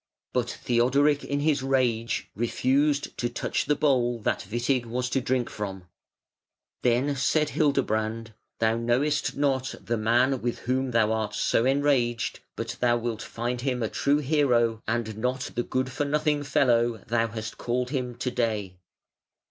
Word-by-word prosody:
But 120 -1 0
Theodoric 140 +5 +2
in 140 0 -2
his 145 -2 +2
rage 125 -4 0
refused 140 +5 +1
to 120 - 0
touch - - -2
the 150 - +3
bowl 125 -5 +2
that 100 - -1
Witig 120 +2 0
was 125 +2 -2
to 135 - +1
drink 125 -2 0
from. 95 -3 -6 0.9
Then 125 +4 +2
said 150 +3 +1
Hildebrand: 115 -7 0 0.2
"Thou 115 0 +2
knowest 125 +6 0
not 135 -2 0
the 120 +1 -2
man 120 +4 +2
with 120 0 -2
whom 130 +1 -1
thou 115 -2 +2
art 110 -1 -1
so 115 - +2
enraged, 130 -4 +1 0.2
but 115 +1 -5
thou 120 -1 +3
wilt 115 -2 -3
find 120 +1 -3
him 125 -2 -1
a 110 - -1
true 145 +1 +2
hero 125 -6 +2
and 110 -2 -2
not 125 +2 -2
the 120 - 0
good 130 +2 -2
for 145 +3 -1
nothing 150 0 +1
fellow 120 -5 +2
thou 115 0 +1
hast 110 -1 -6
called 125 +1 -1
him 125 -4 -2
to 125 +1 -3
day". 105 -7 -2
125 Hz, 155 wpm, -26 LUFS, 115-135 Hz, 0.9 s, the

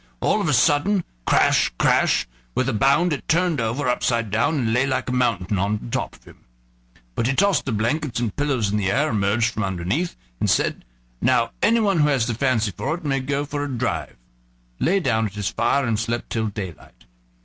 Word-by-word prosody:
All 210 - +1
of 195 - -1
a - - +2
sudden 165 +9 +3 0.2
crash, - - +3
crash! - - +2 0.3
with 130 - +1
a 135 - 0
bound 140 +9 +3
it 140 - -6
turned 170 -4 +1
over, 120 +5 -1
upside 115 -3 0
down, 145 +9 +1
and 115 -4 0
lay 125 +3 +2
like 130 -1 -1
a - - -2
mountain 100 -6 0
on 100 +3 0
the 115 - -9
top - - -3
of - - -22
him. - - -17 0.7
But 115 - -1
he 135 - 0
tossed 200 -3 +2
the 135 - -2
blankets 120 +5 -1
and 115 -4 -2
pillows 135 -8 0
in 105 - 0
the 100 -2 0
air, 140 +9 +1
emerged 110 +3 +1
from 110 - -2
underneath, 95 - -2 0.2
and - - 0
said: - - 0 0.4
"Now 125 -2 +2
anyone 210 -5 +3
who 150 - +4
has 135 -6 +2
the 120 - -2
fancy 115 -3 +1
for 150 - -2
it 175 -2 -10
may 135 -2 +1
go 140 +2 -2
a 145 0 -3
drive," 125 -5 -3 0.6
lay 195 +4 +2
down 110 - +1
at 100 - -11
his 105 -2 -2
fire, 135 +4 +1
and 115 -3 0
slept 115 +1 -3
till 110 -1 -1
daylight. 95 - -8
125 Hz, 205 wpm, -22 LUFS, 110-145 Hz, 0.7 s, who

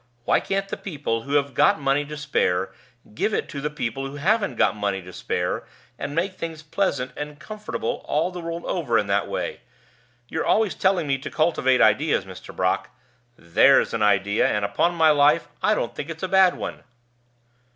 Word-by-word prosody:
Why - - +3
can't 195 0 -2
the - - -5
people 145 - -3
who 140 +5 -6
have 140 -2 +1
got 150 +4 +4
money 140 +1 +1
to 150 +1 -7
spare 95 -11 0 0.4
give 210 - 0
it - - -2
to 140 - -5
the 150 - -1
people 135 -2 -3
who 135 - -9
haven't 200 +9 +1
got - - +2
money 100 -2 -1
to 90 0 -11
spare, - - -2 0.3
and 145 - -4
make 185 +4 0
things 165 -3 -6
pleasant 150 -5 -1
and 150 0 -6
comfortable 210 +7 -4
all 160 +5 0
the 180 - -7
world 170 0 -5
over 140 -10 0
in 105 - +1
that 100 0 0
way? - - -4 0.7
You're 160 - -2
always 215 -3 +2
telling 190 -3 +1
me 135 -2 0
to - - -6
cultivate 145 -5 +2
ideas, 110 - +3
Mr. 95 -1 -11
Brock - - 0 0.5
There's 85 +11 +4
an 115 - -1
idea, 100 0 +3
and, 105 -1 0
upon 170 +13 +1
my 160 -2 +5
life, 145 0 +4
I - - +3
don't - - -2
think 145 - -6
it's 160 +1 -7
a - - 0
bad 190 -1 +5
one." - - -6
145 Hz, 195 wpm, -24 LUFS, 115-170 Hz, 0.7 s, my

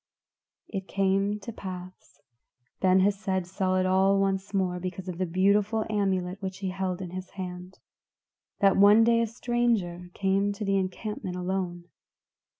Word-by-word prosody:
It 195 -2 -5
came 195 +1 +1
to 230 - -7
pass 185 -6 -9 0.6
Ben 185 0 +4
Hesed 195 -2 0
saw 185 +1 -1
it 185 - +2
all 190 +1 +3
once 195 0 0
more 185 -3 0
because 185 +1 -5
of 180 -1 -5
the 185 - 0
wonderful 205 +4 +2
amulet 190 -2 -1
which 190 -1 -4
he 190 -1 -3
held 185 0 -3
in 175 - -7
his 185 0 -6
hand 180 0 -7 0.8
that 195 -1 +5
one 205 +3 +7
day 230 0 +4
a 230 - +1
stranger 225 -7 -1
came 195 +1 +1
to 210 +1 -5
the 195 0 +2
encampment 190 0 -3
alone. 180 -1 -3
190 Hz, 150 wpm, -27 LUFS, 185-200 Hz, 0.8 s, one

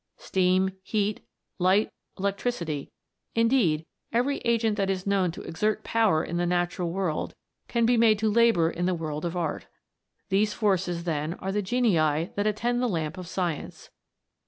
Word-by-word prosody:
Steam, 185 0 +2
heat, 205 +1 -1 0.4
light, 190 +4 +3 0.3
electricity 195 - -2 0.5
indeed, 230 -10 +3 0.3
every 250 +5 +1
agent 230 -2 +1
that 195 -2 0
is 190 -1 -2
known 195 -2 +2
to - - -9
exert 210 +6 -1
power 215 -9 +2
in 170 - -3
the 175 - +1
natural 175 0 0
world, 180 -3 -2 0.3
can 235 -1 +1
be 240 +1 +3
made 225 -2 +5
to 220 +1 0
labour 205 -8 +4
in 175 +1 -2
the 185 - +1
world 155 -1 -4
of 170 +1 -3
art. 165 -3 -3 0.6
These 210 +2 +2
forces, 185 -5 0
then, 160 0 -2
are 190 - -4
the 205 +1 0
genii 220 -3 +2 0.3
that 205 +1 0
attend 240 +3 0
the 250 - +1
lamp 160 -5 -2
of 185 -2 -8
science. 175 -4 -4
190 Hz, 160 wpm, -27 LUFS, 175-220 Hz, 0.6 s, made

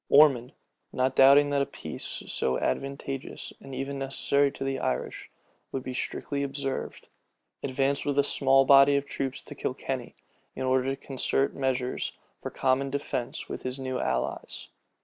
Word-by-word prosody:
Ormond, 135 -4 +6 0.4
not 130 +1 +1
doubting 140 +2 +7
but 140 -1 +2
a - - +2
peace, - - -6
so 65 - 0
advantageous 135 - -3
and 135 -1 -9
even 135 +1 -3
necessary 140 +1 +1
to - - -5
the 135 -1 -1
Irish, 60 - -3 0.4
would 130 - -3
be 130 - -4
strictly 140 +2 -3
observed, 135 -1 -4 0.5
advanced 135 +1 0
with 145 -1 -1
a 140 - +6
small 135 -1 +4
body 140 +1 +7
of 140 0 +1
troops 135 -2 -4
to - - -9
Kilkenny, - - -4 0.4
in - - -3
order 130 0 +2
to 135 0 0
concert 135 0 +1
measures 130 -2 -1 0.3
for - - -4
common 135 +1 +1
defence 135 -3 -3
with - - -5
his 130 +1 -4
new 130 -1 -2
allies. - - -2
135 Hz, 155 wpm, -28 LUFS, 130-140 Hz, 0.5 s, doubting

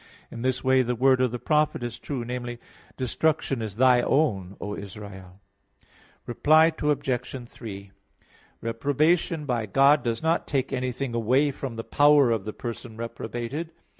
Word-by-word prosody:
In 115 - -7
this 130 0 -1
way, 130 0 +4
the 125 0 -1
word 130 +1 +3
of 130 - +3
the 125 - -4
prophet 150 -1 +1
is 120 -1 -5
true 130 -5 -4
namely, 120 0 -5 0.4
"Destruction 135 0 0
is 110 -3 -5
thy 125 +1 +5
own, 100 - 0
O 105 0 -4
Israel." 95 -2 -10 0.9
Reply 155 +7 +4
Obj. 130 -4 -1
3: 100 -5 -9 0.7
Reprobation 150 +7 +1
by 120 -5 -1
God 140 +6 +5
does 115 +1 -2
not 165 +1 +1
take 135 -2 -1
anything 130 0 -2
away 130 +6 +2
from 135 -3 -6
the 115 - -5
power 145 -2 +4
of 110 -4 -1
the 110 - -5
person 115 -1 -7
reprobated. 120 +7 -5
125 Hz, 150 wpm, -26 LUFS, 115-140 Hz, 0.9 s, thy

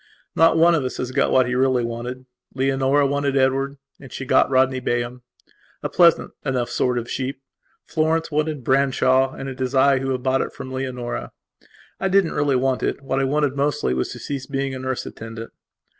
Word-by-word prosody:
Not 165 0 +5
one 170 +1 +5
of 155 -5 +1
us 130 - -4
has 125 0 -3
got - - +1
what 130 -1 +4
he 125 - -2
really 130 -1 +2
wanted. 120 +2 -6 0.3
Leonora 135 +1 +2
wanted 140 0 0
Edward, 135 +1 +1 0.2
and 135 - -13
she - - -6
has 130 - -11
got - - +4
Rodney 130 0 +2
Bayham, 120 0 -2 0.6
a - - -1
pleasant 170 -2 +4
enough 125 -3 -1
sort 125 -1 0
of 120 -1 -3
sheep. 130 +1 -4 0.5
Florence 160 +1 0
wanted 150 -2 -1
Branshaw, 130 0 +2
and 135 - -6
it 130 -1 -7
is 130 +1 -2
I 135 0 +4
who 135 0 -3
have 130 -1 -2
bought 130 0 +2
it - - -4
from 130 - -8
Leonora. 125 -2 -4 0.7
I - - 0
didn't 190 -2 +2
really 145 -2 +1
want 130 0 +1
it; - - -2
what 135 0 -1
I 135 - +1
wanted 145 0 0
mostly 145 - 0
was 65 0 -1
to - - -9
cease 140 -2 -5
being 135 -1 -2
a 130 - -5
nurse 130 -1 -3
attendant. 115 0 -8
135 Hz, 205 wpm, -22 LUFS, 130-140 Hz, 0.7 s, Not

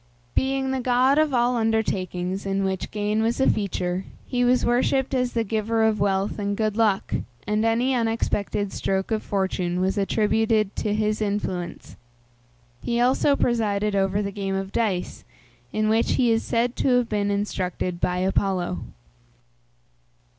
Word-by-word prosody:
Being 265 0 0
the 265 - -1
god 255 +3 +3
of 310 -1 +2
all 245 0 +2
undertakings 195 -5 -1
in 195 0 -1
which 190 -1 -2
gain 210 +1 -1
was 230 +3 0
a 265 - +3
feature, 185 -3 -1 0.2
he 245 -1 0
was 250 +1 +3
worshipped 255 +3 +1
as 250 -1 0
the 230 - +1
giver 220 +1 0
of 220 -1 +2
wealth 195 +1 0
and 200 0 -2
good 215 -2 0
luck, 215 -4 +1 0.3
and 210 +1 0
any 235 +4 +2
unexpected 225 -4 -1
stroke 190 +2 -1
of 215 -1 +1
fortune 185 -3 -1
was 190 +2 0
attributed 215 +1 +1
to 210 -1 0
his 215 0 0
influence. 190 -4 -3 0.8
He 235 0 -1
also 260 +3 +3
presided 210 -5 0
over 195 +1 +1
the 200 - -3
game 195 -1 -3
of 195 0 -3
dice, 200 -6 -1 0.5
in 215 0 0
which 225 +1 +2
he 245 -2 +3
is 225 0 +2
said 240 +1 0
to 255 -2 +3
have 245 -2 +1
been 205 -2 0
instructed 185 -3 -2
by 180 0 +1
Apollo. 185 -1 0
215 Hz, 155 wpm, -24 LUFS, 195-235 Hz, 0.8 s, god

